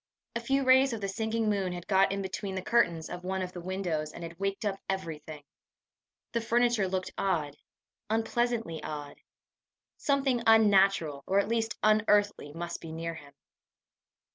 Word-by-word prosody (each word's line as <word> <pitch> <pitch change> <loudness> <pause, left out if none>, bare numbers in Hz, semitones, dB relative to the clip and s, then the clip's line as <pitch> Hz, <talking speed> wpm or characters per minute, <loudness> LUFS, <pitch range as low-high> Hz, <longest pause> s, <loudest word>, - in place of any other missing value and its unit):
A - - +1
few 270 +4 +1
rays 260 0 +5
of 225 - -4
the 200 - -1
sinking 220 +2 -1
moon 195 -3 0
had 175 -1 -7
got 195 -1 +3
in 195 0 -2
between 190 0 -4
the 185 - -3
curtains 170 -10 +2
of 180 - -7
one 190 +1 -2
of 180 - -5
the 175 - -7
windows, 175 -4 -2
and - - -9
had 165 +1 -8
waked 195 +2 -2
up 195 -1 -1
everything! 160 -5 -4 0.9
The 235 - 0
furniture 235 -3 +2
looked 185 0 -2
odd 155 -7 0 0.5
unpleasantly 225 -5 0
odd. 145 -1 -6 0.8
Something 270 -4 +1
unnatural, 195 -9 +4
or 195 - +2
at 200 - +3
least 225 -1 -1
unearthly, 210 -6 +3
must 170 +2 -5
be 165 - -8
near 165 +1 -4
him! 145 -3 -12
195 Hz, 165 wpm, -29 LUFS, 170-225 Hz, 0.9 s, rays